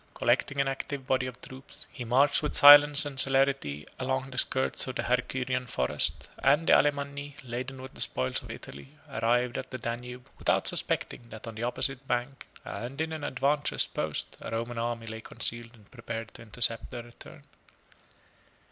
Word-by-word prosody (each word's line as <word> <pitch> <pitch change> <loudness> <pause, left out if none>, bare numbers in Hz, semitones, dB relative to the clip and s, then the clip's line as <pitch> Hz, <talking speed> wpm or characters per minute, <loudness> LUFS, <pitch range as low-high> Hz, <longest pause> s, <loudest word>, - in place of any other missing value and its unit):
Collecting 135 +3 0
an 140 - +1
active 135 0 -5
body 130 -1 0
of 125 -1 -9
troops, 130 +1 -12
he 125 - -8
marched 130 +5 +3
with 150 - -3
silence 145 +1 +10
and 140 -2 -4
celerity 135 - +3
along 130 +1 -3
the 125 - -9
skirts 130 0 +2
of 130 - -6
the - - -2
Hercynian 125 0 -2
forest; 65 -9 +1
and 145 +4 +2
the - - +4
Alemanni, 140 0 0
laden 130 +2 -6
with 130 0 -10
the - - -7
spoils 65 0 0
of - - -13
Italy, 70 -1 -11
arrived 120 +3 -1
at - - -8
the 130 - -6
Danube, 125 +1 -7
without - - 0
suspecting, 120 - -2
that 110 -1 -10
on 115 - -7
the 110 - -8
opposite 130 +2 -2
bank, 125 +2 -3 0.2
and 125 +4 -7
in 160 0 -2
an 155 -2 -7
advantageous 145 +2 0
post, - - -4
a - - -7
Roman 115 +1 -4
army 115 0 -3
lay 110 0 -8
concealed 115 +1 -3
and 105 -3 -23
prepared 115 -3 -7
to - - -12
intercept 115 +1 -2
their 120 -2 -7
return. 120 0 -15
125 Hz, 175 wpm, -28 LUFS, 115-135 Hz, 0.2 s, silence